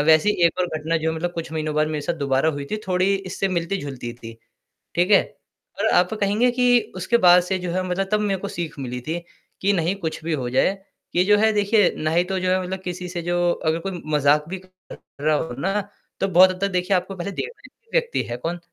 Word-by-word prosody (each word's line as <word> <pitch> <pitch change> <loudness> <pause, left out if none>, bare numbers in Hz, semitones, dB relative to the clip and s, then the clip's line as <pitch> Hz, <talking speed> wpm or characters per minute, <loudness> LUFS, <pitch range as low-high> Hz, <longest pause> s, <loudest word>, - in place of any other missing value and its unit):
वैसे 160 +6 +5 0.2
एक 170 - -2
और 180 - +2
घटना 160 +2 -1
जो 160 0 -1
मतलब 175 +2 -3
कुछ 165 -2 -5
महीनों 155 -1 -2
बाद 155 0 +2
मेरे 155 -1 -2
साथ 170 - -1
दोबारा 135 +3 +2
हुई 145 -2 -5
थी 215 - -1
थोड़ी 185 +1 +2
इससे 195 0 -2
मिलती 175 +1 -1
जुलती 135 -7 -6
थी। 115 -1 -10 0.6
ठीक 180 +4 +2
है? 200 - +7 0.6
और 220 - +2
आप 180 0 +3
कहेंगे 215 +4 +2
कि 245 -1 +4 0.2
उसके 185 +6 +1
बाद 180 0 +8
से 190 +1 -1
जो 180 -1 -4
है 185 +1 -1
मतलब 190 +2 -1
तब 210 - +3
मेरे 200 -2 0
को 200 - -5
सीख 170 -5 -5
मिली 125 -1 -4
थी 160 +6 -3 0.4
कि 200 +1 +3
नहीं 175 +1 0
कुछ 160 -4 -5
भी 165 - -1
हो 125 -5 -2
जाए 160 +10 +2 0.4
ये 180 - +4
जो 205 +1 +5
है 220 +1 +4
देखिए 205 -1 +3
ना 155 0 -1 0.2
तो 190 - -1
जो 185 0 0
है 185 - +2
मतलब 185 +1 -4
किसी 180 0 -5
से 175 -1 -4
जो 175 +1 -1 0.3
अगर 160 +1 +1
कोई 190 -1 -5
मज़ाक 150 +1 +3
भी 190 - -4
कर 185 0 -25 0.4
रहा 155 0 +3
हो 150 -5 -3
ना 195 +7 0 0.4
तो 195 - +1
बहुत 185 +1 +7
तक 200 - +1
देखिए 180 +1 0
आपको 185 +2 -3
पहले 180 +2 -4
देखना 475 - -6 0.2
ही - - -37
व्यक्ति 480 -1 +1
है 120 - -2
कौन? 165 +8 -4
180 Hz, 235 wpm, -23 LUFS, 160-195 Hz, 0.6 s, बाद